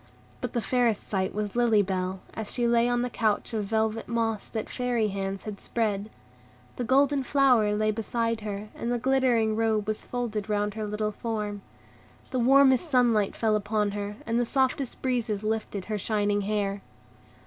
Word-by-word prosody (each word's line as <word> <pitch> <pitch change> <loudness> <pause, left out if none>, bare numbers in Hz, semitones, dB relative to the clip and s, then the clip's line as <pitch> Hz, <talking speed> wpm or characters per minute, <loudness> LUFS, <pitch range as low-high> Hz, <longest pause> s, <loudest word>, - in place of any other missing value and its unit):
But - - -4
the 240 - 0
fairest 240 -4 +1
sight 190 -2 -1
was 210 0 -3
Lily 230 -4 +4
Bell, 185 0 -2
as 220 -2 -5
she 240 -2 0
lay 235 0 +3
on 245 0 +1
the 250 - -1
couch 220 0 0
of 215 -2 -1
velvet 220 +1 0
moss 225 -3 -1
that 220 -2 -4
Fairy 245 -4 0
hands 195 0 -3
had 210 -2 -6
spread. 210 -3 -1 0.7
The 250 - -2
golden 275 +3 +3
flower 250 -6 +3
lay 215 0 +2
beside 230 +1 -1
her, 210 0 -5
and 235 - -3
the 245 - +1
glittering 245 -3 +2
robe 220 -2 +1
was 215 0 -2
folded 220 -4 -3
round 210 0 0
her 215 0 -4
little 210 0 -1
form. 210 -2 -4 0.7
The 255 - 0
warmest 270 +4 +5
sunlight 235 -7 +3
fell 220 -2 +2
upon 210 0 0
her, 205 0 -4
and 230 +1 0
the - - +3
softest 265 0 0
breezes 235 -5 -1
lifted 215 -3 -2
her 215 -1 -3
shining 205 0 +1
hair. 200 -1 -1
220 Hz, 175 wpm, -27 LUFS, 210-240 Hz, 0.7 s, warmest